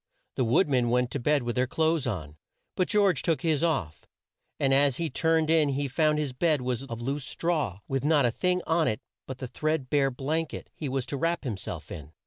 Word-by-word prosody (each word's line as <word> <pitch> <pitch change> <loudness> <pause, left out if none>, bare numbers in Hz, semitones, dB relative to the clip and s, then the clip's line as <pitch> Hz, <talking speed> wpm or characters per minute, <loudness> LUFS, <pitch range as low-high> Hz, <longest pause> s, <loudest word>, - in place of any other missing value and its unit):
The 130 - +1
wood 125 +11 +3
men 125 -4 +2
went 125 0 +1
to 140 - -2
bed 145 +2 +2
with 120 -1 -3
their 130 0 +1
clothes 160 0 +1
on, 80 - -4 0.4
but 185 - +1
George 195 -8 +3
took 165 -2 0
his 160 -3 +1
off, 115 - -1 0.5
and 135 -1 +2
as 140 -1 +4
he 165 -3 -2
turned 160 +2 +2
in 155 -3 +4
he 140 +1 -1
found 150 +3 +2
his 145 -4 -2
bed 155 +1 +1
was 125 +1 -2
of 120 -3 -6
loose 135 +2 -2
straw 150 - -2
with 135 -1 -1
not 150 -3 +3
a 120 - +2
thing 180 +7 0
on 160 -1 +2
it 110 - 0 0.3
but 130 - -6
the 130 - -5
thread 155 0 -2
bare 140 -2 +3
blank 150 +5 -2
et - - -9
he 150 - -5
was 130 -1 -2
to 140 +2 -4
wrap 165 +2 -1
him 120 -5 -2
self 95 - -7
in. 75 0 -8
140 Hz, 230 wpm, -27 LUFS, 125-160 Hz, 0.5 s, as